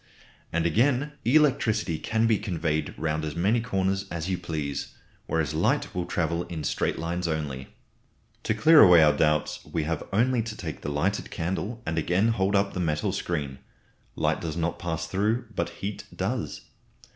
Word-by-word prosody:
And 85 0 0
again, 130 - +2
electricity 120 - +2
can 110 0 0
be 110 -2 +3
conveyed 80 -6 -2
round 80 -1 -1
as 75 0 -4
many 105 +7 +2
corners 95 -3 -1
as 85 +2 -3
you - - +2
please, 80 -5 -4 0.3
whereas 80 -4 0
light - - +1
will 90 -1 -2
travel 85 0 0
in 80 -3 -6
straight - - -1
lines 85 +2 -2
only. 75 -5 -3 0.8
To - - +1
clear 160 0 +7
away 90 -5 +8
our 75 -1 +5
doubts 75 -1 +1
we 80 - -2
have 80 +1 -2
only 120 +4 +2
to 110 -1 -6
take 80 -4 -6
the - - -4
lighted 85 +8 -1
candle 100 +7 -3
and 80 +1 -1
again 90 +7 +2
hold 100 -3 +1
up 100 0 +2
the - - -3
metal 75 -3 0
screen. 70 -6 -3 0.6
Light - - 0
does 80 -1 -4
not 85 0 -1
pass 80 -1 -3
through, 105 +8 0
but - - -1
heat 95 +4 -6
does. - - -3
85 Hz, 170 wpm, -26 LUFS, 80-105 Hz, 0.8 s, away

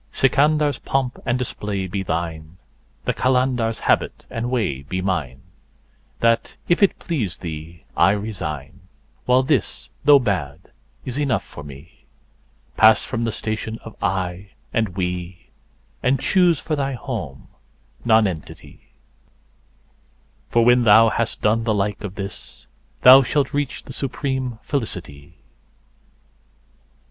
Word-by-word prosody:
Sikandar's3 145 +2 +2
pomp 135 -2 -1
and 120 0 +2
display 105 -6 -3
be 95 +2 -3
thine, 80 -2 -4 0.5
the - - +1
Qalandar's4 125 -3 +1
habit - - 0
and 115 +1 -3
way 105 - -1
be 90 +7 -4
mine; 80 -9 -2 0.8
That, 115 0 +2
if 175 - +2
it 200 - +4
please 115 - -3
thee, 80 0 -8
I 85 - +5
resign, 95 -10 -5 0.5
while 125 +1 +4
this, 130 -4 -1
though 145 0 +8
bad, 90 - -3 0.3
is 130 +2 -3
enough 130 -8 0
for - - -11
me. 70 -1 -13 0.7
Pass 110 0 +6
from 115 -2 -2
the 115 - -1
station 110 0 -3
of 115 - -10
"I" 95 +1 -2 0.2
and 110 -5 -1
"We," 90 -1 -4 0.5
and 130 +1 +2
choose 175 -1 +3
for 155 - -2
thy 140 -1 -1
home 120 - -6 0.5
Nonentity, 105 -8 -1 1.6
For 115 -1 +3
when 120 0 +5
thou 115 +1 +7
has 115 0 -1
done 110 +2 +1
the 110 -2 +1
like 105 +1 -1
of 100 -2 -6
this, 100 -1 -8 0.4
thou 130 +2 +10
shalt 135 +2 0
reach 145 -2 -2
the - - -9
supreme 130 -3 -3
Felicity. 85 - -5
110 Hz, 125 wpm, -22 LUFS, 90-130 Hz, 1.6 s, thou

